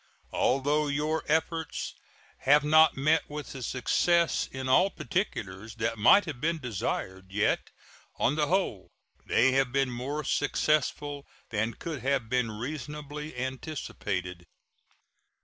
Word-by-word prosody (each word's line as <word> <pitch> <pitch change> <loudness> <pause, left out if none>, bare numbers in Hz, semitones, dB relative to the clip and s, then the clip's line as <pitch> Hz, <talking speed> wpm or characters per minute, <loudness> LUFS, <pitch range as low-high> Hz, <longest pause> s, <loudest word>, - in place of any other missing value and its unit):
Although 145 +3 +2
your 150 +2 0
efforts 160 +1 -1 0.5
have 145 +2 +5
not 155 +1 +5
met 155 +4 +2
with 150 0 -6
the 135 - -7
success 170 +7 +2
in 130 0 -5
all 180 +9 +5
particulars 110 - -3
that 115 -1 -2
might 185 - +6
have 145 -7 -6
been 165 +1 +1
desired, 95 - -4
yet 105 +2 +1 0.5
on 130 - +2
the 150 -1 +1
whole 175 - 0 0.4
they 130 +3 +4
have 135 -1 +2
been 135 -1 +1
more 135 +5 -3
successful 145 -2 0 0.2
than 110 +1 -1
could 160 -5 -5
have 130 -4 0
been 125 -2 +1
reasonably 150 +4 -6
anticipated. 100 - -4
135 Hz, 125 wpm, -29 LUFS, 120-150 Hz, 0.5 s, might